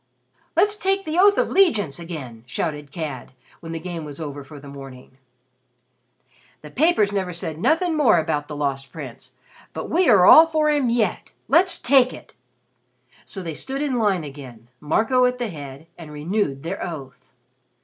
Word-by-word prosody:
"Let's 415 Hz, 0 st, +3 dB
take 390 Hz, -1 st, 0 dB
the 315 Hz, +3 st, -1 dB
oath 405 Hz, +1 st, +5 dB
of -, -, +1 dB
'legiance 210 Hz, -, +2 dB
again," 145 Hz, -10 st, -8 dB
shouted 150 Hz, +1 st, -4 dB
Cad, 145 Hz, -6 st, -6 dB, 0.3 s
when 165 Hz, -, -9 dB
the 165 Hz, -, -4 dB
Game 170 Hz, -1 st, -6 dB
was 145 Hz, -1 st, -9 dB
over 145 Hz, -3 st, -6 dB
for 145 Hz, +1 st, -12 dB
the 140 Hz, -, -13 dB
morning. 135 Hz, -1 st, -12 dB, 1.4 s
"The 150 Hz, -, -11 dB
papers 285 Hz, -, +2 dB
never 190 Hz, -3 st, -2 dB
said 160 Hz, -2 st, -5 dB
nothin' 320 Hz, -, +1 dB
more 270 Hz, -, +4 dB
about 155 Hz, -2 st, -1 dB
the 150 Hz, -, -7 dB
Lost 135 Hz, -2 st, -3 dB
Prince, -, -, -10 dB, 0.4 s
but -, -, -6 dB
we 350 Hz, -2 st, +3 dB
are 195 Hz, -6 st, +6 dB
all 320 Hz, -, +9 dB
for 310 Hz, -2 st, +1 dB
him 285 Hz, -5 st, +1 dB
yet! 235 Hz, -2 st, -1 dB
Let's 370 Hz, +3 st, +4 dB
take 255 Hz, -1 st, +4 dB
it!" -, -, -13 dB, 0.9 s
So 190 Hz, -, -6 dB
they 165 Hz, -2 st, -5 dB
stood 270 Hz, -, -4 dB
in 265 Hz, -4 st, -1 dB
line 200 Hz, -6 st, +1 dB
again, 130 Hz, -5 st, -11 dB
Marco 225 Hz, -, +2 dB
at 250 Hz, 0 st, 0 dB
the 240 Hz, -3 st, -3 dB
head, 145 Hz, -3 st, -9 dB
and 160 Hz, -3 st, -10 dB
renewed 150 Hz, -2 st, -2 dB
their 175 Hz, +4 st, -4 dB
oath. 140 Hz, -7 st, -8 dB
170 Hz, 170 wpm, -22 LUFS, -, 1.4 s, all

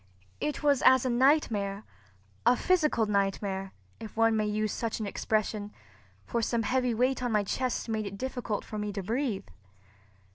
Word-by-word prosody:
It 300 Hz, 0 st, -3 dB
was 285 Hz, -3 st, +3 dB
as 260 Hz, -1 st, +6 dB
a 255 Hz, -, +1 dB
nightmare—a 200 Hz, -, 0 dB
physical 310 Hz, -10 st, +2 dB
nightmare, 195 Hz, -1 st, -1 dB, 0.3 s
if 220 Hz, 0 st, -9 dB
one 225 Hz, 0 st, +4 dB
may 215 Hz, -1 st, +1 dB
use 215 Hz, 0 st, -1 dB
such 230 Hz, -1 st, -3 dB
an 215 Hz, -, -2 dB
expression; 210 Hz, 0 st, -1 dB, 0.5 s
for 235 Hz, -, -1 dB
some 230 Hz, 0 st, 0 dB
heavy 250 Hz, +1 st, +1 dB
weight 255 Hz, +3 st, +1 dB
on 245 Hz, -1 st, -1 dB
my 210 Hz, -1 st, +2 dB
chest 250 Hz, +6 st, -2 dB
made 220 Hz, -2 st, -2 dB
it 200 Hz, 0 st, -7 dB
difficult 245 Hz, -3 st, -3 dB
for 215 Hz, -, -5 dB
me 210 Hz, 0 st, -2 dB
to 195 Hz, -1 st, -4 dB
breathe. 230 Hz, 0 st, -1 dB
220 Hz, 160 wpm, -29 LUFS, 200-250 Hz, 0.5 s, as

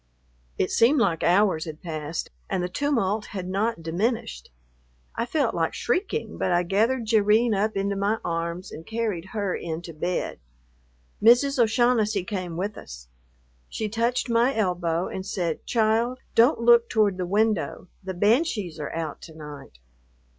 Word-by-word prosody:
It -, -, 0 dB
seemed 260 Hz, +6 st, +4 dB
like 170 Hz, -8 st, +1 dB
hours 180 Hz, -3 st, +3 dB
had 155 Hz, -1 st, -7 dB
passed 155 Hz, -1 st, -4 dB, 0.2 s
and 190 Hz, -2 st, -1 dB
the -, -, 0 dB
tumult 220 Hz, -4 st, 0 dB
had 180 Hz, -1 st, -4 dB
not 195 Hz, -1 st, -1 dB
diminished. 165 Hz, -, -2 dB, 0.7 s
I 230 Hz, +1 st, -2 dB
felt 300 Hz, +4 st, 0 dB
like -, -, -1 dB
shrieking, 415 Hz, +4 st, -2 dB
but 185 Hz, -, 0 dB
I 175 Hz, 0 st, +3 dB
gathered 225 Hz, +7 st, +1 dB
Jerrine 220 Hz, +1 st, +3 dB
up 210 Hz, +1 st, 0 dB
into 200 Hz, 0 st, 0 dB
my 200 Hz, +3 st, 0 dB
arms 170 Hz, +2 st, -3 dB
and 160 Hz, -, -8 dB
carried 220 Hz, -5 st, -3 dB
her 200 Hz, -1 st, -2 dB
in 165 Hz, 0 st, -5 dB
to 170 Hz, -, -8 dB
bed. 175 Hz, -, -3 dB, 0.8 s
Mrs. 245 Hz, +4 st, +5 dB
O'Shaughnessy 220 Hz, -3 st, +2 dB
came 185 Hz, -4 st, -4 dB
with 200 Hz, +3 st, -3 dB
us. -, -, -11 dB, 0.6 s
She 215 Hz, -1 st, -3 dB
touched 235 Hz, +4 st, 0 dB
my 235 Hz, +3 st, +2 dB
elbow 180 Hz, -4 st, 0 dB
and 190 Hz, -, -5 dB
said, 175 Hz, -4 st, -3 dB
"Child, 230 Hz, +2 st, +1 dB, 0.2 s
don't 235 Hz, +4 st, +4 dB
look 235 Hz, 0 st, +5 dB
toward 210 Hz, -4 st, +2 dB
the 180 Hz, -1 st, -3 dB
window, 200 Hz, -5 st, 0 dB, 0.2 s
the 190 Hz, 0 st, -5 dB
banshees 210 Hz, -, +1 dB
are 150 Hz, -, -4 dB
out 160 Hz, -3 st, -4 dB
to 160 Hz, -, -12 dB
night." 150 Hz, -, -10 dB
200 Hz, 155 wpm, -25 LUFS, 170-230 Hz, 0.8 s, Mrs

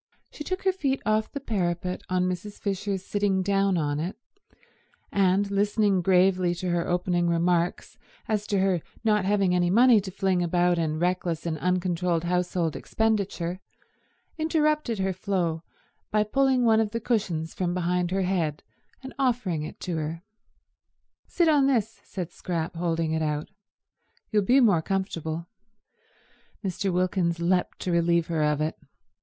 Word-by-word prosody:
She 300 Hz, -, -7 dB
took 370 Hz, +4 st, -4 dB
her 380 Hz, -, +3 dB
feet 275 Hz, -7 st, -1 dB
off 215 Hz, +1 st, +1 dB
the 280 Hz, -, -4 dB
parapet 180 Hz, -7 st, -2 dB
on 185 Hz, 0 st, +1 dB
Mrs. 185 Hz, +3 st, -5 dB
Fisher's 195 Hz, -1 st, -2 dB
sitting 200 Hz, -2 st, 0 dB
down 195 Hz, -1 st, +2 dB
on 145 Hz, -2 st, -1 dB
it, 170 Hz, +5 st, -3 dB, 1.0 s
and 200 Hz, +1 st, +2 dB
listening 205 Hz, -1 st, +2 dB
gravely 180 Hz, -1 st, +3 dB
to 180 Hz, 0 st, -3 dB
her 175 Hz, -1 st, 0 dB
opening 175 Hz, -1 st, +1 dB
remarks 170 Hz, +1 st, 0 dB, 0.3 s
as 210 Hz, -1 st, -1 dB
to 200 Hz, -, 0 dB
her 190 Hz, -3 st, +1 dB, 0.2 s
not 210 Hz, -3 st, +2 dB
having 195 Hz, -2 st, +2 dB
any 175 Hz, -1 st, +2 dB
money 230 Hz, +2 st, +6 dB
to 190 Hz, -, -7 dB
fling 190 Hz, -1 st, 0 dB
about 175 Hz, 0 st, +2 dB
in 155 Hz, -1 st, -1 dB
reckless 175 Hz, -1 st, -1 dB
and 160 Hz, -2 st, -2 dB
uncontrolled 180 Hz, -1 st, 0 dB
household 180 Hz, -2 st, 0 dB
expenditure, 200 Hz, -5 st, -1 dB, 0.8 s
interrupted 305 Hz, -6 st, +1 dB
her 190 Hz, 0 st, 0 dB
flow 180 Hz, -4 st, -1 dB, 0.5 s
by 215 Hz, 0 st, +2 dB
pulling 260 Hz, +2 st, +2 dB
one 220 Hz, -1 st, +5 dB
of 220 Hz, -2 st, +1 dB
the 230 Hz, +2 st, -3 dB
cushions 195 Hz, -9 st, -1 dB
from 175 Hz, -1 st, -2 dB
behind 180 Hz, 0 st, 0 dB
her 190 Hz, +1 st, 0 dB
head 170 Hz, -5 st, -1 dB, 0.4 s
and 265 Hz, -, -8 dB
offering 235 Hz, -, 0 dB
it 155 Hz, -, -7 dB
to 175 Hz, -3 st, -3 dB
her. 160 Hz, +2 st, -4 dB, 1.0 s
"Sit 345 Hz, -, +2 dB
on 290 Hz, -3 st, +4 dB
this," 225 Hz, -5 st, 0 dB
said 180 Hz, -3 st, -6 dB
Scrap, 170 Hz, -2 st, -4 dB
holding 165 Hz, -1 st, -1 dB
it 160 Hz, 0 st, 0 dB
out. 150 Hz, -1 st, -2 dB, 0.8 s
"You'll 210 Hz, -2 st, +3 dB
be 250 Hz, +7 st, +4 dB
more 200 Hz, -9 st, +4 dB
comfortable." 165 Hz, -3 st, -3 dB, 1.2 s
Mr. 195 Hz, +1 st, -1 dB
Wilkins 180 Hz, -1 st, 0 dB
leapt 180 Hz, +1 st, 0 dB
to 180 Hz, -, -2 dB
relieve 170 Hz, 0 st, +2 dB
her 165 Hz, -2 st, 0 dB
of 150 Hz, 0 st, +1 dB
it. 155 Hz, +1 st, -2 dB
185 Hz, 155 wpm, -26 LUFS, 170-210 Hz, 1.2 s, money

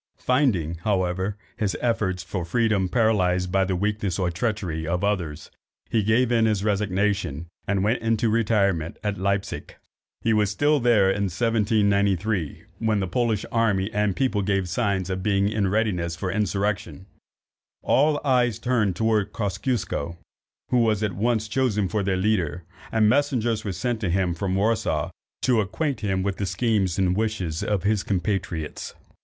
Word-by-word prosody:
Finding, 105 Hz, -, +1 dB
however, 95 Hz, +1 st, -1 dB, 0.2 s
his 100 Hz, -4 st, -1 dB
efforts 105 Hz, -7 st, 0 dB
for 90 Hz, +1 st, -4 dB
freedom 100 Hz, 0 st, +1 dB
paralysed 90 Hz, -5 st, +2 dB
by 95 Hz, +1 st, +3 dB
the 95 Hz, 0 st, -1 dB
weakness 105 Hz, -1 st, -1 dB
or 90 Hz, -3 st, 0 dB
treachery 85 Hz, -6 st, -2 dB
of 90 Hz, +3 st, -1 dB
others, 90 Hz, -7 st, -2 dB, 0.4 s
he 115 Hz, -, +3 dB
gave 115 Hz, +4 st, +2 dB
in 115 Hz, -2 st, +3 dB
his 105 Hz, -3 st, 0 dB
resignation, 100 Hz, -6 st, 0 dB, 0.2 s
and 100 Hz, -1 st, +1 dB
went 110 Hz, +4 st, +1 dB
into 115 Hz, 0 st, +1 dB
retirement 100 Hz, -7 st, +1 dB
at 105 Hz, -2 st, -2 dB
Leipsic. 100 Hz, +1 st, -2 dB, 0.4 s
He 115 Hz, -, +2 dB
was 105 Hz, -2 st, +2 dB
still 145 Hz, +8 st, +2 dB
there 110 Hz, -6 st, +4 dB
in 100 Hz, +1 st, 0 dB
1793, 100 Hz, -3 st, +1 dB, 0.2 s
when 110 Hz, -2 st, +1 dB
the 95 Hz, -, 0 dB
Polish 110 Hz, +2 st, 0 dB
army 105 Hz, -4 st, +1 dB
and 105 Hz, -2 st, +1 dB
people 130 Hz, -6 st, +1 dB
gave 95 Hz, -1 st, 0 dB
signs 95 Hz, 0 st, -1 dB
of 95 Hz, 0 st, -2 dB
being 100 Hz, 0 st, +2 dB
in 105 Hz, -1 st, 0 dB
readiness 95 Hz, -5 st, 0 dB
for 90 Hz, +2 st, -3 dB
insurrection. 100 Hz, -4 st, -2 dB, 0.8 s
All 145 Hz, +2 st, +3 dB
eyes 125 Hz, -5 st, +2 dB
were -, -, -26 dB
turned 115 Hz, -7 st, +1 dB
towards 110 Hz, 0 st, +1 dB
Kosciusko, 100 Hz, -, -2 dB, 0.5 s
who 125 Hz, -, +4 dB
was 110 Hz, -2 st, +2 dB
at 105 Hz, -3 st, -1 dB
once 110 Hz, +1 st, 0 dB
chosen 110 Hz, -4 st, +1 dB
for 105 Hz, +3 st, -1 dB
their 95 Hz, -1 st, 0 dB
leader, 90 Hz, -5 st, 0 dB, 0.3 s
and 110 Hz, -1 st, +3 dB
messengers 120 Hz, -4 st, +1 dB
were 100 Hz, -, -3 dB
sent 115 Hz, +6 st, -2 dB
to 100 Hz, -, 0 dB
him 90 Hz, 0 st, +1 dB
from 95 Hz, +2 st, -2 dB
Warsaw 110 Hz, +3 st, 0 dB, 0.3 s
to 120 Hz, -4 st, +3 dB
acquaint 110 Hz, +6 st, -2 dB
him 95 Hz, -3 st, -1 dB
with 100 Hz, -1 st, -2 dB
the 100 Hz, -, -2 dB
schemes 95 Hz, -1 st, 0 dB
and 90 Hz, -2 st, +2 dB
wishes 95 Hz, -7 st, -2 dB
of 105 Hz, -4 st, -1 dB
his 105 Hz, -1 st, +2 dB
compatriots. 95 Hz, -5 st, -3 dB
100 Hz, 160 wpm, -24 LUFS, 95-110 Hz, 0.8 s, there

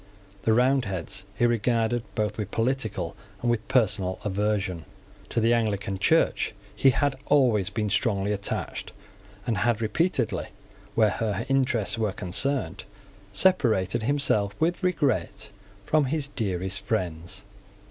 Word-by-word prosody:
The 110 Hz, -, +2 dB
Roundheads 110 Hz, -7 st, +1 dB
he 120 Hz, -, +2 dB
regarded 120 Hz, 0 st, +1 dB
both 105 Hz, -2 st, 0 dB
with 105 Hz, -2 st, -2 dB
political 115 Hz, -7 st, -1 dB, 0.2 s
and 120 Hz, +2 st, +1 dB
with 115 Hz, -2 st, -2 dB
personal 105 Hz, -8 st, +2 dB
aversion. 100 Hz, -4 st, -1 dB, 0.4 s
To -, -, 0 dB
the 115 Hz, +1 st, +3 dB
Anglican 100 Hz, -4 st, 0 dB
Church -, -, +2 dB, 0.2 s
he 135 Hz, -, +5 dB
had 140 Hz, +1 st, +1 dB
always 120 Hz, -9 st, +3 dB
been 105 Hz, +1 st, -2 dB
strongly 105 Hz, -2 st, +1 dB
attached, 100 Hz, -1 st, -3 dB, 0.5 s
and 115 Hz, -4 st, 0 dB
had 115 Hz, +1 st, +2 dB
repeatedly, 160 Hz, +11 st, 0 dB, 0.5 s
where 110 Hz, -2 st, +4 dB
her 105 Hz, -3 st, -2 dB
interests 125 Hz, -6 st, +1 dB
were 105 Hz, -3 st, 0 dB
concerned, 130 Hz, +11 st, -1 dB, 0.5 s
separated 115 Hz, -, +3 dB
himself 110 Hz, -6 st, +1 dB
with 170 Hz, +4 st, +1 dB
regret 145 Hz, -, 0 dB, 0.3 s
from 155 Hz, -2 st, +3 dB
his 140 Hz, +1 st, -1 dB
dearest 95 Hz, -6 st, -2 dB
friends. 90 Hz, -2 st, -3 dB
110 Hz, 125 wpm, -26 LUFS, 100-130 Hz, 0.5 s, he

